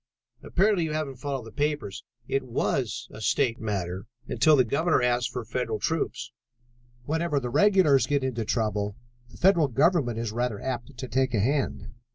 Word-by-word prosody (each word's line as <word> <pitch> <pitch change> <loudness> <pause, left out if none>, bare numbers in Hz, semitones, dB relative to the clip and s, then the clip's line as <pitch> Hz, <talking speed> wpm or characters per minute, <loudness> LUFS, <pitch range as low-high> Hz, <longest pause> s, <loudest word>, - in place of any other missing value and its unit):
"Apparently 195 -1 +2
you 155 -1 -2
haven't 150 -4 -3
followed 135 -2 -4
the 115 - -10
papers. 145 -7 -2 0.2
It 135 - 0
was 125 0 -2
a 110 - -10
state 120 +1 +1
matter 95 -2 -3 0.2
until 155 -2 +4
the 130 - +5
Governor 140 +4 +1
asked 120 0 +1
for 120 -1 -5
federal 115 -1 -2
troops. 160 +7 -2 0.7
Whenever 160 0 0
the 125 -2 -4
regulars 160 -3 +4
get 145 -2 +1
into 125 -3 -1
trouble, 105 -2 -1 0.3
the 115 - -15
federal 175 -5 +4
government 140 -2 +2
is 115 -2 -2
rather 120 -2 -2
apt 130 0 -5
to 130 - -5
take 130 0 +1
a - - +2
hand." 135 +7 -1
130 Hz, 170 wpm, -27 LUFS, 115-150 Hz, 0.7 s, the